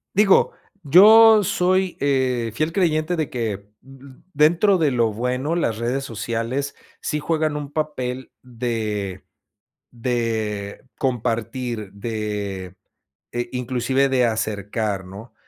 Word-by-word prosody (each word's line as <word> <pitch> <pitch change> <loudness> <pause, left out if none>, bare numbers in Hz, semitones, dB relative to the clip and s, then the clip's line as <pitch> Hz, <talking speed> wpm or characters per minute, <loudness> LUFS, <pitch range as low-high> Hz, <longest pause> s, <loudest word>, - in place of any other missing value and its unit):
Digo, 200 -1 +4 0.3
yo 215 +7 +8
soy, 185 0 +1
eh, 130 -4 0
fiel 155 +5 0
creyente 165 -1 +1
de 155 -3 -1
que, 105 -5 -4 0.2
uh 135 +1 -15 0.4
dentro 170 +7 +4
de 160 -4 +2
lo 115 -3 +1
bueno, 125 +7 -1
las 115 -11 0
redes 125 +4 -2
sociales 120 +4 -3 0.3
sí 150 - -2
juegan 155 -1 -1
un 145 -1 -6
papel 130 -5 -3
de 110 -6 -4 0.7
de 115 -4 -3
compartir, 115 -3 -2
de, 105 -3 -4
eh, 90 0 -14 0.6
e 120 0 -3
inclusive 125 +2 0
de 125 -2 +3
acercar, 105 -2 -2
¿no? 100 +5 -11
125 Hz, 115 wpm, -22 LUFS, 110-150 Hz, 0.7 s, yo